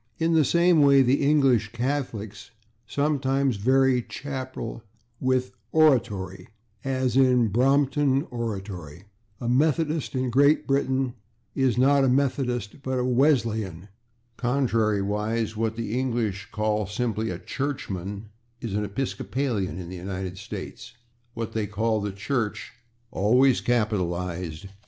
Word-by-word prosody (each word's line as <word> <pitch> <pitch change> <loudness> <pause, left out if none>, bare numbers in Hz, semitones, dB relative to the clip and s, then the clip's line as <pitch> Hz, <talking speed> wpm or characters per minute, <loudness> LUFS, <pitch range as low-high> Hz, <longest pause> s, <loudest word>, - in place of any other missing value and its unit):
In 165 +1 +1
the 160 -1 +5
same 170 +2 +4
way 140 -1 +6
the 130 +3 +2
English 135 -7 +3
Catholics 120 -5 -3 0.4
sometimes 135 -3 0
vary 130 +3 +3
/chapel/ 130 -3 -6 0.4
with 130 -1 0 0.2
/oratory/, 105 -12 +2 0.4
as 130 -2 -1
in 125 -4 +4
/Brompton 135 +3 +2
Oratory/. 95 -8 -5 0.4
A 120 - -4
Methodist, 150 +3 +1
in 130 -1 -1
Great 140 +4 +4
[Pg113] - - -24
Britain, 135 -2 +1 0.4
is 130 -3 +1
not 140 +2 +4
a - - +3
/Methodist/, 125 -3 0
but 130 -1 -2
a 125 - 0
/Wesleyan/. 115 - +1 0.5
Contrariwise, 110 -3 0
what 110 0 -1
the 115 -1 -3
English 115 -7 -2
call 105 -1 0
simply 110 +1 -2
a 90 - -3
/churchman/ 100 -5 -4 0.4
is 115 -4 -5
an 105 +1 0
/Episcopalian/ 120 -2 -2
in 90 - -7
the 95 - -7
United 95 0 -5
States, 110 +3 -8 0.4
what 115 -1 -4
they 110 -2 -1
call 110 +2 0
the 105 0 -2
/Church/ 110 +3 -2 0.4
(always 125 +6 +3
capitalized!) 90 -7 -1
120 Hz, 125 wpm, -25 LUFS, 105-135 Hz, 0.5 s, way